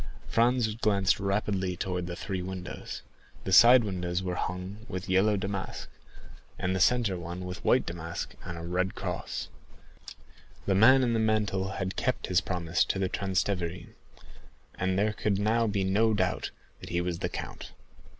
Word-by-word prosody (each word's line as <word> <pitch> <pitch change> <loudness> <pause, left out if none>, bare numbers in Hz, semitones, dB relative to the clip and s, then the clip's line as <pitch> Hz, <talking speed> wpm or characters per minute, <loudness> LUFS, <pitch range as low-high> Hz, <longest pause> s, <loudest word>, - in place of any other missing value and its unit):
Franz 120 -1 +2
glanced 100 -5 +2
rapidly 100 -2 -1
towards 90 -2 -2
the 85 - -4
three 95 0 -4
windows. 95 0 -6 0.4
The 95 - -2
side 120 +4 +9
windows 90 -2 -2
were 90 -1 -2
hung 90 +4 -4
with 95 0 -5
yellow 100 +2 +3
damask, 95 0 -4 0.7
and 90 +1 -1
the - - 0
centre 115 -5 +3
one 85 +2 -6
with 90 +1 -6
white 125 - +3
damask 85 0 -5
and 85 - -6
a 85 - -7
red 90 +2 -1
cross. - - -4 1.2
The 100 - +2
man 130 +7 +6
in 120 -2 +1
the 115 - +1
mantle 105 -3 0
had 95 0 -3
kept 130 +1 0
his 90 - +5
promise 90 -3 0
to - - -1
the 95 -1 0
Transteverin, 90 -3 -2 0.8
and 95 0 -1
there 105 +2 +2
could 105 -2 0
now 110 +3 +2
be 100 -2 0
no 105 +4 +3
doubt 95 -3 0 0.3
that - - -9
he 85 - 0
was 90 -1 -2
the - - -1
count. - - -7
95 Hz, 165 wpm, -29 LUFS, 90-105 Hz, 1.2 s, side